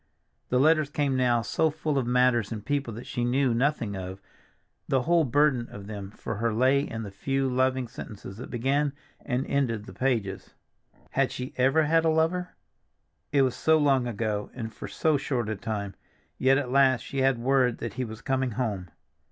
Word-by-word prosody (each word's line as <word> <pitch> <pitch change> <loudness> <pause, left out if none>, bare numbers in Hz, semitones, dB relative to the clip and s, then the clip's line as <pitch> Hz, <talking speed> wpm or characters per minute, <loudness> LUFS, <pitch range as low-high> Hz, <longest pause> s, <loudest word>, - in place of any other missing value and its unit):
The 125 - +2
letters 155 0 +4
came 145 -2 0
now 120 -2 +2
so 160 - +1
full 150 -2 -1
of 125 - -2
matters 125 -3 +3
and 105 -2 -5
people 145 -4 -1
that 120 - -8
she 120 - -3
knew 125 +1 +2
nothing 120 -4 0
of; 95 0 -6 0.7
the 130 -2 +1
whole 170 +2 +3
burden 135 -2 +2
of 100 -1 -9
them 100 -2 -6
for 105 +1 -6
her 115 +1 0
lay 130 +5 +3
in 115 -5 -4
the 100 - -7
few 135 +6 -1
loving 130 0 +1
sentences 105 -4 -9
that 125 - -8
began 135 +4 0 0.3
and 130 0 -1
ended 115 -7 -1
the - - -10
pages. 115 -7 -2 0.6
Had - - +1
she 125 +1 -6
ever 135 +5 +3
had 165 +2 +3
a 165 - +3
lover? 165 +3 0 0.8
It 140 -2 +4
was 130 -2 +1
so 160 +4 +3
long 135 -4 +3
ago, 105 -2 -2
and 110 -3 -5
for - - -7
so 155 -2 +1
short 125 -5 -2
a 110 - -1
time! 100 -1 -4 0.5
Yet 135 +1 +4
at 130 -3 -2
last 130 -3 +4
she 135 - -5
had 135 -1 +3
word 125 0 +2
that 115 - -5
he 130 - -2
was 110 -2 -8
coming 130 -2 0
home. 105 -7 -2
130 Hz, 195 wpm, -27 LUFS, 115-140 Hz, 0.8 s, letters